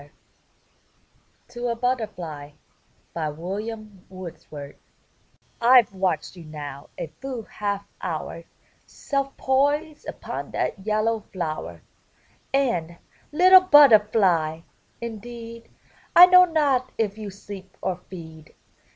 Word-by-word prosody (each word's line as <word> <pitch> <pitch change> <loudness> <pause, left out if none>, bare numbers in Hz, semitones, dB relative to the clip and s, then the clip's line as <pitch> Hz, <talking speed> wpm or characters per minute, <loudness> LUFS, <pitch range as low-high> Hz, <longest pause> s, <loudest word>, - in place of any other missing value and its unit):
'* - - -39
TO 240 0 -5
A 235 - -1
BUTTERFLY 180 - -3 0.6
William 195 +6 -5
Wordsworth 160 -6 -10 0.8
Fve 240 -1 +6
watched 185 -4 -1
you 175 - -11
now 145 -2 -8
a - - -3 0.2
full 260 -4 -5
half 200 -1 -4
hour, - - -5 0.4
Self 275 -1 -3
poised 290 +4 0
upon - - -6
that 195 +1 -3
yellow 215 +1 +1
flower; 155 - -5 0.7
And, 180 -12 0 0.3
little 370 +4 +8
Butterfly! 210 - +5 0.4
indeed 230 0 -8 0.5
I 355 - +12
know 365 0 +7
not 285 -7 +1
if 215 -1 -1
you 210 -1 -5
sleep 195 -1 -11
or 185 -2 -2
feed. 160 -4 -11
215 Hz, 100 wpm, -24 LUFS, 170-255 Hz, 0.8 s, I